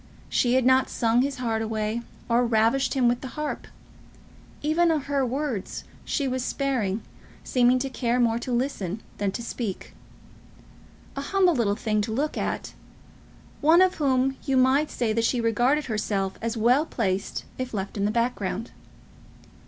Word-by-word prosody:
She 245 0 +2
had 260 -1 +3
not 260 +1 +4
sung 235 0 +2
his 275 +1 -1
heart 230 -3 -1
away, 220 +1 -2 0.3
or 235 +1 +3
ravished 235 +3 +2
him 255 -3 +3
with 240 0 +1
the 265 - -5
harp. 300 0 -3 1.0
Even 325 +3 +3
of 310 -4 +1
her 280 -1 0
words 255 -5 -3 0.2
she 280 - -1
was 255 -1 -1
sparing, 245 -8 -1 0.4
seeming 250 0 +3
to 265 +2 -1
care 245 -2 0
more 230 -1 +2
to 250 - -5
listen 235 -6 -2 0.2
than 200 -1 0
to 235 - -4
speak; 230 -4 -5 1.2
a 275 - -3
humble 370 +4 +3
little 220 -7 +1
thing 215 -1 0
to 220 +2 -3
look 285 +7 -1
at, - - -3 0.9
one 325 +5 +6
of 370 0 +1
whom 265 -1 +2
you 270 -2 +1
might 265 +4 +4
say 230 -3 -1
that 230 +1 +1
she 240 +2 +1
regarded 240 +6 +2
herself 205 -4 -1
as 230 +1 -2
well 245 +6 +4
placed 195 -4 -2
if 255 -1 -3
left 195 -2 -4
in 200 -1 0
the - - +2
background. 230 -2 -1
245 Hz, 165 wpm, -26 LUFS, 220-270 Hz, 1.2 s, one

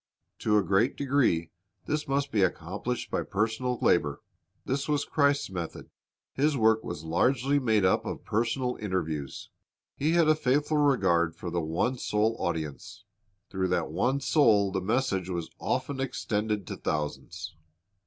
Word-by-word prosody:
To 105 -1 +2
a 105 - +3
great 100 +6 +2
degree 130 - +1 0.3
this 150 0 -2
must 140 0 0
be 105 - +2
accomplished 95 +7 -2
by - - 0
personal 110 +5 -1
labor. 75 -5 +2 0.4
This 140 +3 -2
was 145 -1 +1
Christ's 145 -5 +1
method. 85 -3 -6 0.4
His 145 +1 +1
work 110 -1 +3
was 85 -3 -6
largely 130 - +2
made 110 -6 +2
up 95 - +3
of - - -6
personal 120 +3 0
interviews. 80 -9 -4 0.4
He 155 +4 +1
had 170 -2 +4
a 155 - +6
faithful 150 +1 +1
regard 95 - +3
for 90 - -6
the 85 - 0
one 90 +11 -1
soul 110 +2 +1
audience. 80 -2 -4 0.5
Through 95 -1 0
that 85 -3 -1
one 130 - 0
soul 110 -10 +4
the 95 0 -1
message 95 -3 0
was 85 -3 -4
often 140 -2 -2
extended 105 -5 -2
to - - -6
thousands. 75 -1 -4
110 Hz, 150 wpm, -28 LUFS, 90-135 Hz, 0.5 s, a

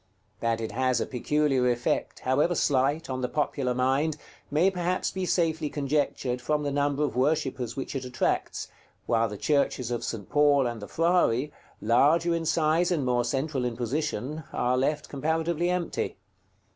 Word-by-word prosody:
That 115 -1 0
it 110 - -4
has 130 -1 +1
a - - 0
peculiar 135 0 +1
effect, 120 0 -1
however 145 +7 +2
slight, 140 +2 +1
on 130 -1 -3
the 125 - -1
popular 135 -4 -1
mind, 135 +5 +1 0.3
may 170 +6 +3
perhaps 180 0 -1
be 190 -1 -3
safely 160 -4 +1
conjectured 140 -3 -1
from 150 +4 0
the 145 - -1
number 145 +1 +1
of 145 - -1
worshippers 130 -3 0
which 135 - -4
it 135 - -2
attracts, 125 -1 -1 0.4
while 115 -1 +2
the 105 - -6
churches 135 -2 0
of 120 - -2
St. 105 -4 -4
Paul 145 -2 +4
and 120 -2 -3
the 105 - -7
Frari, 160 -6 +2 0.3
larger 155 +9 +4
in 165 -1 -2
size 160 +2 +2
and 160 -7 0
more 125 -1 +2
central 135 +2 -1
in 120 -2 -2
position, 140 +3 -2
are 125 +1 +1
left 145 +4 0
comparatively 160 +4 -1
empty. 180 - -2
140 Hz, 165 wpm, -27 LUFS, 125-155 Hz, 0.4 s, Paul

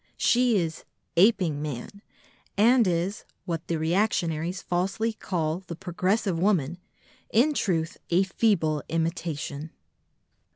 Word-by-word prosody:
She 245 -2 +3
is 165 -3 -2 0.3
"aping 175 -6 +3
man" 150 +7 -6 0.6
and 235 +1 +5
is 180 +4 -1 0.2
(what 165 -2 -4
the 165 - 0
reactionaries 170 0 0
falsely 195 +6 -1
call 165 -5 -2
the 180 -3 -8
progressive 185 +1 -1
woman), 175 -4 +1 0.5
in 265 +8 +4
truth, 165 - -1
a 175 +3 +4
"feeble 185 -7 +1
imitation." 160 -2 -3
175 Hz, 110 wpm, -26 LUFS, 160-200 Hz, 0.6 s, and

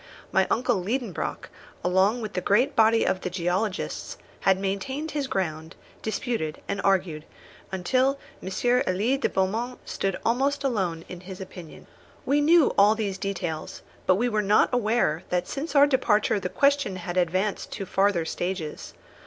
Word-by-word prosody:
My 190 0 +3
uncle 235 -5 +1
Liedenbrock, 225 - -3 0.3
along 190 +6 +2
with 215 -2 -5
the 180 - -1
great 215 +9 +2
body 225 0 +4
of 185 - 0
the - - -3
geologists, 185 +3 -2 0.2
had 190 -1 +3
maintained 230 +11 -3
his 285 -2 -2
ground, 160 -5 -3 0.3
disputed, 220 -8 -2
and 200 0 -2
argued, 185 -6 +1 0.5
until 255 +9 +1 0.2
M. 190 - -5 0.4
Elie 210 +9 +1
de - - +1
Beaumont 225 +6 -1
stood 195 -1 -2
almost 275 +5 +1
alone 185 -11 -1
in 180 - -8
his 185 +1 -9
opinion. 180 -4 -10 0.4
We 290 +1 +3
knew 320 0 +5
all 205 +2 +6
these 200 -3 -3
details, 180 -6 -4 0.2
but 185 - +5
we 235 +6 +1
were 215 -3 +1
not 210 +1 +4
aware 220 -9 +1
that 180 0 0
since 290 +2 -5
our 285 0 +8
departure 230 -7 +2
the 180 - -3
question 280 -7 +2
had 175 -1 -5
advanced 185 +3 0
to 195 - -4
farther 190 -3 +1
stages. 175 -2 -4
200 Hz, 155 wpm, -26 LUFS, 185-245 Hz, 0.5 s, our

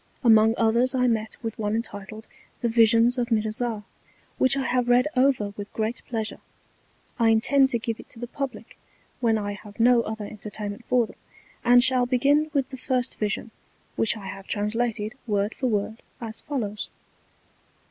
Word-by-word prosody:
Among 225 -1 +6
others 235 +3 +2
I 250 -1 +2
met 220 -2 0
with 225 -1 -5
one 210 0 0
entitled, 215 -1 -5 0.3
The 235 - +1
Visions 230 +2 +4
of 240 0 -1
Mirzah, 220 0 -1 0.6
which 260 +1 +4
I 270 - 0
have 245 0 +1
read 245 +3 +5
over 255 -6 +2
with 205 -1 -7
great 220 +2 -2
Pleasure. 220 -2 -3 0.8
I 230 -1 +4
intend 265 +5 +4
to 240 - 0
give 230 -1 -4
it - - -13
to - - -14
the 240 - -5
Publick 275 +1 -6 0.4
when 230 -3 +2
I 205 -1 -3
have 205 +1 -11
no 240 +1 +5
other 220 -2 -5
entertainment 210 +1 -6
for 250 -2 +4
them; - - -15 0.5
and 245 0 +6
shall 255 -1 +3
begin 285 +5 +3
with 275 -3 0
the 265 - -7
first 250 -1 -2
Vision, 215 +2 -2 0.4
which 225 +1 +2
I 200 - -9
have 195 0 -7
translated 215 +1 -1
Word 205 0 0
for 260 - -2
Word 220 0 -2 0.2
as 225 -2 -7
follows. 220 -8 -4
230 Hz, 170 wpm, -25 LUFS, 215-250 Hz, 0.8 s, Among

